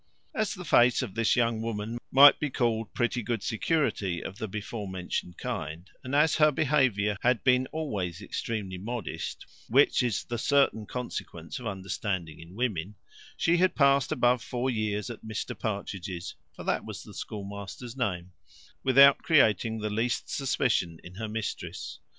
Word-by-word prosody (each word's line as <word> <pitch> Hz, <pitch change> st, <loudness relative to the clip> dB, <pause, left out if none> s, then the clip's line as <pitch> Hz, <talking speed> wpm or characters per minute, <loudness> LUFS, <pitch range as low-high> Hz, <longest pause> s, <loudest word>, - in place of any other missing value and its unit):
As 215 Hz, -1 st, -1 dB
the 180 Hz, -2 st, -8 dB
face 125 Hz, -3 st, +4 dB
of 110 Hz, -7 st, -6 dB
this 115 Hz, 0 st, +2 dB
young 115 Hz, -2 st, +1 dB
woman 115 Hz, +1 st, -3 dB
might 140 Hz, +2 st, +8 dB
be 150 Hz, -, -1 dB
called 115 Hz, -4 st, 0 dB
pretty 120 Hz, -1 st, 0 dB
good 115 Hz, -2 st, -2 dB
security 110 Hz, -, 0 dB
of 95 Hz, -, -7 dB
the 110 Hz, -, -3 dB
before 105 Hz, +1 st, -5 dB
mentioned 90 Hz, -1 st, -4 dB
kind, 80 Hz, +4 st, -5 dB, 0.2 s
and 130 Hz, +2 st, -3 dB
as 150 Hz, +1 st, +4 dB
her 155 Hz, -1 st, +6 dB
behaviour 130 Hz, -9 st, +2 dB
had 125 Hz, -1 st, +2 dB
been 125 Hz, 0 st, +4 dB
always 100 Hz, -, -3 dB
extremely 100 Hz, -2 st, -4 dB
modest, 115 Hz, 0 st, -5 dB, 0.2 s
which 135 Hz, +4 st, +5 dB
is 120 Hz, -5 st, 0 dB
the 120 Hz, -1 st, -4 dB
certain 135 Hz, -6 st, +2 dB
consequence 120 Hz, -, -5 dB
of 125 Hz, -, -6 dB
understanding 95 Hz, -4 st, -3 dB
in 85 Hz, +3 st, -12 dB
women; 105 Hz, -5 st, -2 dB, 0.4 s
she 170 Hz, +1 st, +3 dB
had 185 Hz, +1 st, +3 dB
passed 140 Hz, -1 st, +4 dB
above 125 Hz, 0 st, +3 dB
four 125 Hz, +2 st, -2 dB
years 110 Hz, 0 st, -2 dB
at 115 Hz, -, -10 dB
Mr 110 Hz, +3 st, -4 dB
Partridge's 100 Hz, -4 st, -4 dB, 0.2 s
(for -, -, -8 dB
that -, -, 0 dB
was -, -, -7 dB
the -, -, -12 dB
schoolmaster's 100 Hz, +4 st, -7 dB
name) 90 Hz, -8 st, -2 dB, 0.5 s
without 140 Hz, +1 st, +7 dB
creating 115 Hz, -7 st, +3 dB
the 105 Hz, -1 st, -3 dB
least 115 Hz, +3 st, -1 dB
suspicion 125 Hz, -, 0 dB
in 90 Hz, -, -11 dB
her 110 Hz, +4 st, -5 dB
mistress. 110 Hz, 0 st, -5 dB
115 Hz, 160 wpm, -28 LUFS, 100-130 Hz, 0.5 s, might